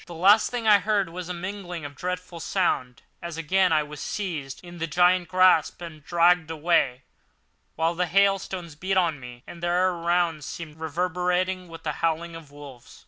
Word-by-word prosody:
The 175 - -9
last 200 +6 +5
thing 240 -2 -3
I 210 -1 +7
heard 205 -4 0
was 180 0 -6
this 180 - -4
mingling 180 -3 -6
of 145 0 -8
dreadful 180 +2 -5
sound, 140 -8 -1 0.2
as 170 -1 -6
again 185 +3 +2
I 155 -1 +3
was 150 0 -10
seized 155 -9 -4
in 175 -1 -11
the 165 - -2
giant 180 +2 +3
grasp 185 -2 +3
and 165 -4 -9
dragged 175 0 +3
away, 155 -5 +1 0.7
while 165 +2 +1
the 180 +1 -1
hailstones 190 -2 +1
beat 190 +5 -2
on 165 -5 +1
me, 125 -1 -11
and 170 - -11
the 175 - -1
air 180 +2 +2
around 170 -2 0
seemed 155 +1 -8
reverberant 180 +3 -1
with 165 0 -11
the 155 - -1
howling 165 0 -1
of 165 -3 -11
wolves. 140 -4 -13
170 Hz, 185 wpm, -25 LUFS, 160-180 Hz, 0.7 s, I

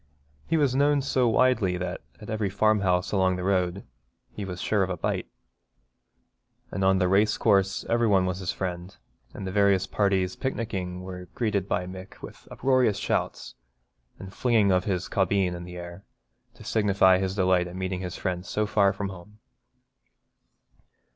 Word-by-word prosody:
He 165 - +1
was 140 -4 +2
known 140 +1 +2
so 130 -2 +1
widely 115 -6 +2
that 90 - -4 0.2
at - - -11
every 110 -2 -1
farmhouse 100 -3 +1
along 95 -2 +2
the 90 - -4
road 95 0 0 0.5
he 105 - -6
was 90 -2 -6
sure 105 +1 +1
of 95 - 0
a 90 - -3
bite. - - -2 1.4
And 95 - -2
on 95 0 +4
the 90 -1 +2
race 105 +3 +3
course 100 -3 +2
every 115 0 +2
one 95 -3 +3
was 90 0 -2
his 90 -2 -2
friend; 90 0 -5 0.3
and 100 - -7
the 95 - -3
various 100 -1 +3
parties 95 -2 0
picnicking 95 -8 -4
were 90 -1 -8
greeted 105 -5 -1
by 90 - -1
Mick 95 +1 -10
with - - -12
uproarious 130 -5 +2
shouts - - -2 0.6
and 95 - -9
a - - -14
flinging 110 -3 +2
of 90 -1 +2
his 95 -3 -1
caubeen 95 -1 +1
in 85 0 -7
the 90 0 -9
air, 85 +2 -9 0.5
to - - -13
signify 100 -3 +3
his 95 0 -2
delight 90 -2 +2
at 90 - -9
meeting 95 0 -3
his 90 -2 -5
friends 90 0 -3
so 105 - 0
far 100 -1 +3
from 100 0 -4
home. 95 +3 -12
95 Hz, 175 wpm, -26 LUFS, 90-105 Hz, 1.4 s, on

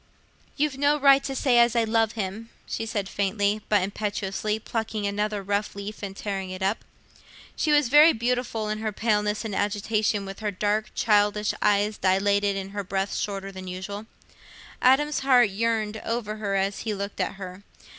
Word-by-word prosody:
"You've 290 -2 0
no 290 +1 +3
right 275 -1 +6
to 270 - -3
say 250 -2 +3
as 235 0 +4
I 235 - +3
love 225 0 +1
him," 215 +2 -5 0.2
she 225 - -4
said, 205 -3 -2
faintly, 205 +2 0
but 205 -3 +3
impetuously, 205 +1 -2
plucking 220 -1 -3
another 205 0 -1
rough 200 +2 -1
leaf 205 +1 -7
and 195 -1 -6
tearing 195 -2 -4
it 185 +1 -5
up. 195 +3 0 0.7
She 310 - 0
was 295 -3 +4
very 300 +6 +7
beautiful 235 -2 -1
in 215 0 -2
her 215 0 -2
paleness 210 0 0
and 215 - -4
agitation, 205 0 0
with 195 0 -8
her 215 -1 -1
dark 210 +2 -1
childish 210 -1 +2
eyes 210 0 +2
dilated 200 +1 +2
and 195 0 -5
her 205 0 -4
breath 195 +1 -2
shorter 195 -1 -3
than 190 -1 -9
usual. 200 +4 -6 0.7
Adam's 290 +4 +4
heart 250 -6 +4
yearned 220 0 -1
over 225 -2 -3
her 200 -2 -2
as 195 +1 0
he 215 -2 -3
looked 200 +1 -5
at - - -1
her. 185 -1 -8
210 Hz, 175 wpm, -25 LUFS, 200-225 Hz, 0.7 s, very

